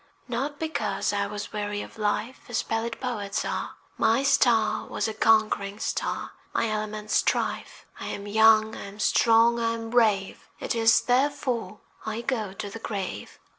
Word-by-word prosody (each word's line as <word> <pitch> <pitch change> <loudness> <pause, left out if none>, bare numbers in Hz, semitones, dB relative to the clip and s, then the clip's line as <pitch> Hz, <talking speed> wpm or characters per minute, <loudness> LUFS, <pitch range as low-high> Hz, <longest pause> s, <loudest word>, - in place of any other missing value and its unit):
Not 270 +4 -3
because 220 -13 -1
I 200 0 0
was 210 +1 -6
weary 205 0 -3
of - - -13
life 215 +4 -1
As 240 - 0
pallid 225 +1 -3
poets 210 -6 -3
are: - - -3 0.2
My 230 +5 +3
star 225 -6 +3
was - - -2
a 220 - -3
conquering 215 -2 +2
star, - - -3 0.2
My 230 - +1
element 215 0 -4
strife. - - 0
I - - -5
am 200 - -5
young, 220 +1 +5
I - - -7
am 200 +1 -12
strong, 230 +2 +4
I 230 0 0
am 225 0 -6
brave, 215 -5 +1
It - - -2
is 225 -1 +4
therefore 255 -4 0 0.2
I 220 +1 -3
go 230 -6 -2
to 195 +2 -6
the 215 +3 -8
grave. 195 - -5
220 Hz, 165 wpm, -26 LUFS, 210-235 Hz, 0.2 s, young